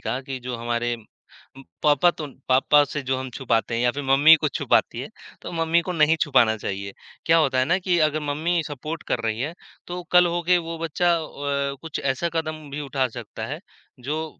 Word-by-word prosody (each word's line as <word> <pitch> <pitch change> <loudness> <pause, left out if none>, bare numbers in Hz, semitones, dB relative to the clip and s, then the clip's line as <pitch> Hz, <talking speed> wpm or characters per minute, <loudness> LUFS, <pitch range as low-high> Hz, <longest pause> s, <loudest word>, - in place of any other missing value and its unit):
कहा 130 - -3
कि 135 0 -6
जो 125 0 -5
हमारे 120 +1 -1
उम, 115 +4 -18 0.2
पापा 150 +3 +4
तो 155 -3 -7 0.2
पापा 135 +3 +5
से 145 0 -5
जो 130 0 -1
हम 130 0 -5
छुपाते 115 -3 0
हैं 115 - 0
या 125 - +3
फिर 145 - -4
मम्मी 140 +4 +7
कुछ 150 -4 -2
छुपाती - - +1
है, - - -6 0.3
तो - - -7
मम्मी 165 0 +2
को 180 - -4
नहीं 160 -1 +3
छुपाना 125 -6 +3
चाहिए। 100 -1 -5 0.3
क्या 165 +1 +5
होता 135 -4 +2
है 130 - +4
ना 175 +7 +2
कि 180 -2 +1
अगर 155 +1 -3
मम्मी 165 +4 0
सपोर्ट 155 +3 -6
कर - - +1
रही 110 0 -1
है, 150 +6 -3 0.3
तो 180 0 -5
कल 180 0 +7
होके 175 +1 +3
वो 165 -1 -6
बच्चा 170 +2 +1
व 145 -2 -7 0.3
अ, - - -9
कुछ 160 -2 -5
ऐसा 135 +5 -1
कदम 155 -2 -3
भी 145 +2 -5
उठा 135 -2 -1
सकता - - -7
है - - -6 0.4
जो 150 +5 -3
145 Hz, 215 wpm, -24 LUFS, 130-165 Hz, 0.4 s, मम्मी